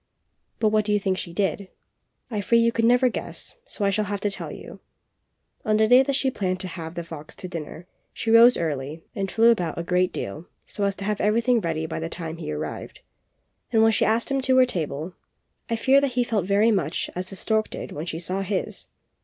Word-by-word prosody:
But 220 - +2
what 215 0 +2
do 210 - +1
you 205 - +3
think 190 -2 -1
she 170 - -5
did? 195 +1 -1 0.6
I 210 -2 -1
fear 235 +4 +3
you 230 0 +3
never 245 +2 +4
could 250 - +2
guess, - - -5
so 205 - -2
I 200 - +3
shall 210 +2 0
have 200 0 -3
to 205 - 0
tell - - -5
you - - -10 0.8
On 215 0 +2
the 220 0 +4
day 250 +3 +7
that 270 +1 0
she 270 -1 +2
had - - -8
planned 185 -2 -1
to 190 - -2
have 165 -1 -7
the 170 - -4
fox 160 -2 -10
to 185 - -7
dinner, 165 -1 -7 0.3
she 225 - -2
rose 235 +2 +8
early 150 0 -3
and 195 -2 -3
flew 230 +4 +5
about 180 -8 -1
a 170 - -2
great 180 +1 +1
deal 155 - -6 0.2
so 205 - -3
as 200 0 0
to 200 - -6
have 210 0 -1
everything 230 +3 +2
ready 160 -3 -2
by 160 - -4
the 165 +1 -4
time 165 -1 -6
he 155 -2 -5
arrived; 155 - -6 0.7
and 220 -2 +4
when 225 - +5
she 220 - +2
asked 230 +4 +1
him 275 0 +1
to 260 0 +3
her 255 - +7
table 165 - -3 0.6
I 230 - +1
fear 265 +4 +4
that 275 -3 0
he 245 0 +2
felt 210 -6 -1
very 205 +3 +4
much 170 -6 -1
as 185 +1 -4
the 195 - -8
stork 220 +2 0
did - - -7
when 155 +4 -6
she 165 -1 -4
saw 185 +3 -2
his. 195 0 -2
200 Hz, 235 wpm, -24 LUFS, 170-230 Hz, 0.8 s, rose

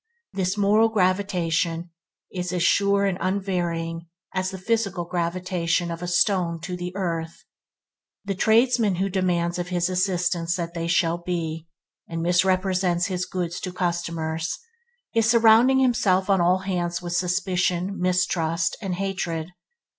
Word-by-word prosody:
This 190 +1 -1
moral 210 +3 +4
gravitation 180 -4 0 0.4
is 180 -1 -3
an 180 - -1
sure 200 +3 +3
and 190 -1 -1
unvarying 175 -4 -2 0.3
as 185 0 -1
the 190 - -6
physical 195 -3 -1
gravitation 175 0 -1
of 165 0 -6
a 175 - -4
stone 175 -2 +1
to 180 +2 -5
the 180 0 -5
earth. 165 -4 -3 0.8
The 200 - -1
tradesman 225 0 +3
who 190 +3 -1
demands 180 -2 0
of 175 - -3
his 175 -1 0
assistants 180 -2 0
that 170 -2 -4
they 170 -1 -3
shall 170 0 +1
be, 165 -2 -4 0.4
and 165 0 -3
misrepresents 180 0 +2
his 185 -1 -2
goods 180 -1 -3
to 185 - -5
customers, 170 -2 -2 0.6
is 225 -1 +3
surrounding 235 +3 +6
himself 205 -7 +2
on 190 -2 +3
all 180 +2 +4
hands 175 -2 -2
with 175 0 -4
suspicion, 180 +1 0
mistrust, 170 -2 +1
and 190 -4 -2
hatred. 180 -3 -3
180 Hz, 140 wpm, -24 LUFS, 170-195 Hz, 0.8 s, surrounding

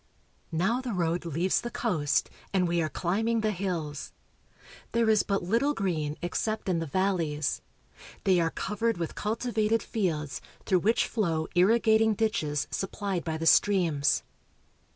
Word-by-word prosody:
Now 190 +10 +1
the 250 -3 -4
road 170 -1 -1
leaves 170 +4 +1
the 240 - -4
coast, 170 - 0 0.2
and 185 -2 +2
we 170 0 +1
are 155 - -1
climbing 220 +8 0
the 215 0 +1
hills. 170 -7 -3 0.8
There 230 -1 +2
is 215 - +4
but 195 -2 -1
little 235 +11 +1
green 155 -6 -1
except 215 +5 -2
in 180 -3 +1
the 165 - -3
valleys. 165 -4 0 0.6
They 190 -3 +4
are 165 -1 +2
covered 210 +4 -1
with 170 -2 -3
cultivated 220 0 0
fields, 160 -9 -2 0.2
through 185 - +3
which 220 +6 +2
flow 165 -8 -1
irrigating 220 +3 +4
ditches 155 -10 0
supplied 195 -2 -2
by 160 -1 -2
the 165 - -4
streams. 165 -6 +3
185 Hz, 145 wpm, -28 LUFS, 165-220 Hz, 0.8 s, is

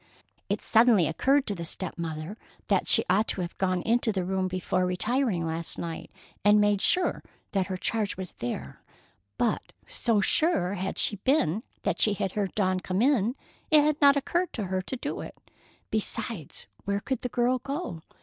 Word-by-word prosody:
It - - -1
suddenly 225 -5 +5
occurred 270 - +2
to 205 - -1
the 170 -3 -6
step 175 +2 -4
mother 160 +2 -5 0.3
that - - +2
she - - +5
ought 205 +4 +3
to 190 - -2
have 170 -1 -5
gone 185 -2 0
into 230 0 +2
the 190 -3 -1
room 190 0 0
before 185 0 -1
retiring 205 0 0
last 165 +1 -2
night 165 -1 -5 0.3
and 205 +1 +6
made 205 -1 +3
sure 365 0 +2 0.3
that 190 -2 0
her 190 -1 -3
charge 210 +1 -1
was 185 -2 -6
there; 70 - -5 0.6
but 235 -3 -1
so 235 - +1
sure 200 - +2
had 190 -1 -3
she 205 - +1
been 215 - +1 0.2
that - - -1
she 210 -2 +4
had 190 0 -2
heard 200 -2 -2
Dawn 185 -3 +1
come 185 +3 -1
in, 250 -4 +2 0.3
it 305 -2 +6
had 300 0 +1
not 280 0 +7
occurred 345 +6 0
to 220 - -3
her 185 0 -1
to 260 +8 -5
do 285 - -4
it. - - -9 0.5
Besides, 215 -5 -3 0.2
where 200 0 -1
could 265 +4 -3
the 250 - -3
girl 245 +2 +1
go? 275 - -5
200 Hz, 185 wpm, -27 LUFS, 185-245 Hz, 0.6 s, not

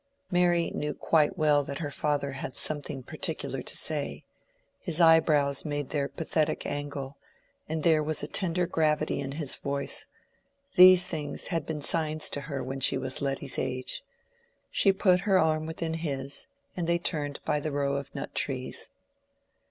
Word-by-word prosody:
Mary 175 -1 +2
knew 150 0 -3
quite 155 +1 +2
well 150 -2 +3
that 140 0 -5
her 145 -3 -4
father 145 -1 -1
had 135 0 -6
something 145 -3 -1
particular - - -3
to - - -3
say: - - -2 0.6
his 165 0 -2
eyebrows 155 -4 +4
made 145 -2 -3
their 140 -2 -1
pathetic 155 -1 -1
angle, 145 -1 -4 0.5
and 160 -1 -2
there 160 -2 +4
was 155 0 -1
a - - -2
tender 180 -1 0
gravity 155 -2 0
in 140 -1 -4
his 145 -2 +1
voice: 140 0 -1 0.7
these 185 0 +9
things 150 -3 -5
had 165 -5 -2
been 150 -2 -4
signs 155 -1 +2
to 145 - -3
her 140 -2 -4
when 135 +2 -5
she 135 - +4
was 130 0 -1
Letty's 135 -1 -1
age. 130 0 -3 0.7
She 195 - +4
put 185 -2 +3
her 195 +1 +3
arm 155 -2 +2
within 160 0 -3
his, 140 -4 -2 0.3
and 175 -2 -2
they 170 0 +3
turned 150 -4 -2
by 150 - +1
the 155 +1 -3
row 140 -1 0
of 140 0 -6
nut 140 - -5
trees. 130 -2 -2
150 Hz, 165 wpm, -28 LUFS, 140-165 Hz, 0.7 s, these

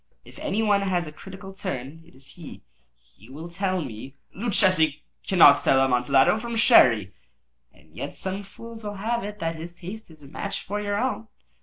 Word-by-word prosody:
If - - -14
any 215 +3 -1
one 205 -2 +3
has 185 -3 0
a 155 - -8
critical 190 +4 -11
turn, 160 -5 -6
it 170 - -20
is 135 +1 -15
he. 170 -4 -11 0.3
He 105 - -21
will 155 +5 -8
tell 185 -1 -1
me—" 130 +2 -9 0.2
"Luchesi 185 -8 +2 0.2
cannot 165 -7 +7
tell 135 - +4
Amontillado 135 - +3
from 235 +1 -5
Sherry." 120 - +5 0.6
"And - - -24
yet - - -6
some 190 +1 -4
fools 225 +3 -11
will 205 -1 -5
have 230 +4 -2
it 210 +1 -6
that 165 -3 -3
his 170 +2 -8
taste 190 +5 -9
is 155 -2 -16
a - - -12
match 180 +7 -5
for 205 +2 -4
your 205 0 -2
own." 245 -2 -2
185 Hz, 185 wpm, -25 LUFS, 145-205 Hz, 0.6 s, cannot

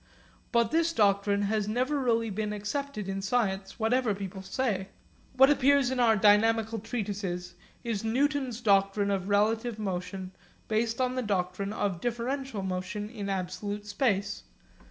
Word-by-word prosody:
But 235 -2 +2
this 330 +1 +2
doctrine 200 -2 +2
has 210 0 0
never 255 +7 0
really 230 -4 +1
been 210 +1 -2
accepted 210 +1 -4
in 195 0 -3
science, 195 -2 -1
whatever 230 -1 +1
people 195 -1 -6
say. 195 -2 -2 0.5
What 270 +2 +7
appears 280 -2 +4
in 260 - -1
our 230 -2 +5
dynamical 220 +2 +3
treatises 195 -5 -4 0.3
is 225 -4 -2
Newton's 260 +1 0
doctrine 200 -1 +3
of 195 0 -2
relative 220 +3 +1
motion 185 -2 -4 0.4
based 225 +2 0
on 255 -1 +1
the 255 - -1
doctrine 195 -2 -1
of 200 -5 -2
differential 240 -1 -2
motion 190 +3 -4
in 205 -4 -5
absolute 195 +2 -3
space. 205 -2 0
210 Hz, 140 wpm, -29 LUFS, 195-240 Hz, 0.5 s, What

